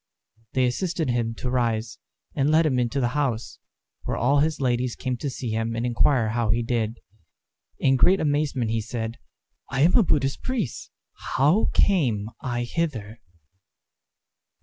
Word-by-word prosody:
They 130 -1 +3
assisted 160 +2 -1
him 115 -1 -1
to 125 +2 -4
rise, 115 -2 -1 0.3
and 140 0 +1
led 160 +1 +4
him 130 -5 +2
into 125 +3 0
the 120 -2 +1
house, 125 -4 -2 0.4
where - - -3
all 140 +4 +3
his 155 +2 +1
ladies 125 -2 0
came 130 -2 -3
to 140 - -3
see 125 -3 -4
him 115 +1 -1
and 115 +1 -2
inquire 120 -1 +2
how 115 0 -1
he 115 +2 +2
did. 115 -1 -1 0.8
In 135 -1 +3
great 185 +8 +5
amazement 145 -6 0
he 115 0 0
said, 115 +1 -5 0.5
"I 135 - -1
am 170 +5 +5
a - - +7
Buddhist 140 -8 +1
priest. 240 - -3 0.5
How 150 +11 +3
came 115 - +2
I 120 -1 -2
hither?" 120 -6 -3
125 Hz, 155 wpm, -25 LUFS, 115-145 Hz, 0.8 s, a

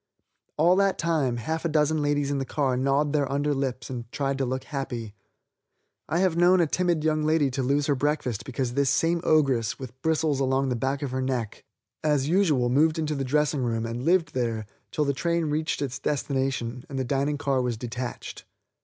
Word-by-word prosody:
All 170 +4 +5
that 195 -1 +2
time 150 -8 0
half 160 +8 -3
a 170 - 0
dozen 155 0 +2
ladies 145 -1 0
in 140 - 0
the - - -1
car 135 -1 0
gnawed 140 +3 +1
their 145 -3 +1
under 145 +1 +1
lips 130 -3 -3
and 120 -2 -7
tried 140 -1 -1
to 135 - +1
look 130 +1 -2
happy. 120 -7 -5 1.0
I 165 - +1
have 185 -3 +2
known 175 +2 +5
a 170 - +4
timid 170 0 0
young 155 -1 +1
lady 155 -3 +2
to 135 +1 -2
lose 140 +3 +1
her 145 - +2
breakfast 140 -5 -1
because 130 -1 -3
this 140 0 +2
same 165 +1 +2
ogress, 135 -8 +2
with 130 -1 -10
bristles 155 -2 +1
along 135 0 +1
the 125 - 0
back 135 +4 -2
of 135 - -3
her 130 0 -1
neck, 125 -5 -3 0.4
as 145 -3 +2
usual 155 -8 +3
moved 155 +6 +3
into 155 -1 -1
the 140 -2 -2
dressing 150 +1 +1
room 115 -2 -1
and 115 +1 -4
lived 170 +2 +2
there 115 -4 -1 0.2
till 150 - 0
the 140 - +1
train 170 +1 0
reached 155 -1 -1
its 130 -3 -4
destination 130 -4 -2
and 135 - -5
the 130 - 0
dining 140 +3 0
car 140 -2 0
was 125 -2 -1
detached. 120 +1 -6
140 Hz, 205 wpm, -26 LUFS, 130-155 Hz, 1.0 s, All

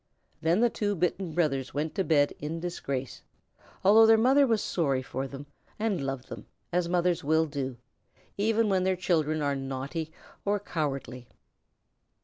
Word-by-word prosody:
Then 170 +6 +2
the 240 - +5
two 205 -1 -1
bitten 180 0 -1
brothers 135 -7 0
went 150 +2 -1
to 195 - 0
bed 145 -4 +3
in 155 +3 -4
disgrace, 140 -7 -4 0.6
although 220 +3 +7
their 225 0 +7
mother 265 +5 +5
was 225 -3 +1
sorry 140 -7 0
for 130 +1 -4
them 140 +1 -9 0.3
and 210 -8 -1
loved 135 -2 -4
them, - - -9 0.3
as 175 -1 +1
mothers 175 -1 +1
will 160 +2 +3
do, 135 -4 -4 0.6
even 220 +2 +2
when 190 -2 +2
their 190 0 +2
children 155 -4 0
are 140 -1 +1
naughty 135 +4 -4 0.3
or 205 0 +1
cowardly. 135 -9 -4
160 Hz, 155 wpm, -28 LUFS, 140-195 Hz, 0.6 s, although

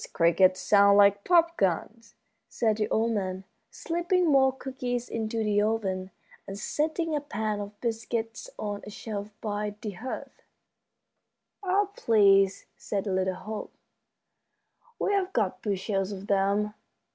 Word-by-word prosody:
"Those - - -7
crickets 185 +2 +3
sound 200 -1 +5
like 200 0 +5
pop 335 -1 +3
guns," 205 +5 -1 0.3
said 220 -3 0
the 210 - -1
old 225 +1 +1
man, 190 -3 -2 0.3
slipping 345 +2 0
more 270 -4 +5
cookies 255 -2 -4
into 225 0 -2
the 205 -1 +2
oven 195 -4 -1 0.4
and 195 - -6
setting 315 - -1
a 295 - -1
pan 215 -6 -3
of 205 0 -8
biscuits 230 - -3
on 205 -1 -4
a - - -8
shelf 205 -1 -6
by 210 -1 -3
the 210 - -5
hearth. 225 +8 -7 1.2
"Oh, 400 +1 +1
please," 195 -3 +4
said 200 -1 -3
little 190 -1 0
Hope, 215 +3 -7 1.2
"we've 395 -2 0
got 210 -5 0
bushels 195 -1 -1
of 195 -1 -7
them!" 200 +1 +1
210 Hz, 135 wpm, -28 LUFS, 200-245 Hz, 1.2 s, sound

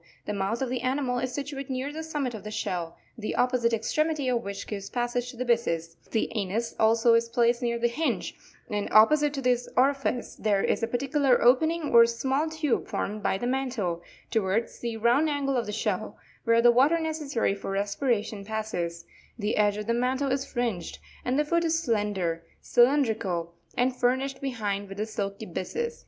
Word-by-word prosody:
The 210 - -3
mouth 205 +5 -1
of 260 - -2
the 250 -1 -2
animal 255 -1 0
is 255 0 -2
situate 275 0 -5
near 265 +2 -3
the 315 - -5
summit 295 -6 -3
of 215 -3 -7
the 210 - -6
shell, 175 -5 -3 0.2
the 220 -3 -4
opposite 250 -2 +2
extremity 290 +5 0
of 240 -1 0
which 200 0 -5
gives 200 -2 -6
passage 245 0 -1
to 245 - -10
the 255 - -2
byssus; 165 -9 0
the 220 - 0
anus 215 +3 -1
also 225 +1 +4
is 230 0 +3
placed 235 +1 +2
near 235 -1 0
the 235 0 +2
hinge; 310 +7 -1 0.3
and 205 -3 -2
opposite 295 +7 +6
to 270 - -4
this 245 -1 +1
orifice 270 -2 +1
there 205 -2 +1
is - - +1
a 230 - +1
particular 270 +2 +2
opening 315 +5 +3
or 235 0 +8
small 265 +6 0
tube 310 -5 -1
formed 210 +1 -3
by 190 - +1
the 240 - -4
mantle; 245 -10 -1 0.3
towards 220 +1 0
the 235 -2 -3
round 240 +8 +3
angle 280 -2 0
of 240 -3 0
the - - -3
shell, 215 -1 -2 0.3
where 230 0 +4
the 240 - +8
water 275 +7 +4
necessary 310 -9 -1
for 200 - -6
respiration 205 +1 -1
passes, 195 -6 -3 0.3
the 210 -1 -1
edge 205 -1 +2
of 210 - -4
the 230 - +1
mantle 255 +3 0
is 265 0 0
fringed; 235 -9 -3 0.3
and 250 +2 0
the 300 - +2
foot 340 +3 +1
is 325 0 +2
slender, 205 - -1 0.2
cylindrical, 225 - +2 0.2
and 255 +1 +2
furnished 260 +2 0
behind 205 -7 -2
with 195 +1 -8
a 215 - 0
silky 205 -1 -4
byssus. 465 - -4
240 Hz, 190 wpm, -27 LUFS, 210-270 Hz, 0.3 s, or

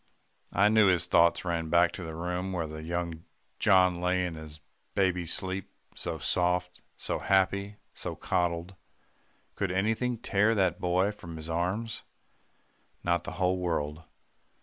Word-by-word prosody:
I 100 +3 +4
knew 110 -1 +5
his 90 -2 +3
thoughts 85 +2 +4
ran 85 -2 -1
back 85 +1 +4
to 90 - -7
the 80 -1 -6
room 90 +3 -3
where 80 -3 -3
young 85 0 -4 0.4
John 90 -2 +4
lay 90 0 +1
in 90 - -3
his 80 -1 -9 0.4
baby 90 -3 +1
sleep, 95 +3 -1 0.2
so 85 -2 -4
soft, 90 +2 0 0.2
so - - -2
happy, 100 +1 +1 0.2
so - - -5
coddled. 90 0 -1 0.8
Could 100 - -2
anything 110 +6 0
tear 110 0 +2
that 95 -4 +1
boy 90 +3 +2
from 85 -5 -9
his 80 +1 -5
arms? 95 +7 -2 1.0
not 85 0 +1
the - - -5
whole 90 0 +1
world. 80 -3 -2
90 Hz, 145 wpm, -29 LUFS, 85-95 Hz, 1.0 s, knew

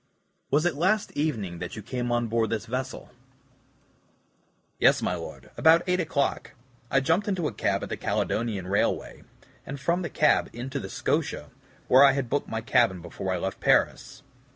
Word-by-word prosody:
"Was 150 +4 +2
it 175 - +2
last 185 +8 +1
evening 110 - -2
that 90 - -6
you 105 - -8
came 120 +2 -3
on 120 0 +1
board 115 0 0
this 115 -2 -2
vessel?" 130 +3 -5 1.7
"Yes, - - +5
my - - 0
Lord, - - -8
about 165 +2 +5
8 180 0 +1
o'clock. 150 -4 -1 0.4
I 135 - +3
jumped 190 +10 +1
into 185 -6 0
a - - -5
cab - - -1
at - - -5
the - - -3
Caledonian 105 -5 -1
Railway, 100 +2 -1 0.4
and 140 0 -7
from 170 +6 0
the 170 - -3
cab 150 - +2
into 130 +4 -5
the - - -7
SCOTIA, - - -2 0.4
where 130 +2 +7
I 140 -1 +7
had 135 -4 -3
booked 145 - -1
my 115 - -3
cabin 115 -5 +2
before 85 +2 -5
I 90 - 0
left 95 +2 -4
Paris. - - +1
130 Hz, 175 wpm, -26 LUFS, 110-155 Hz, 1.7 s, where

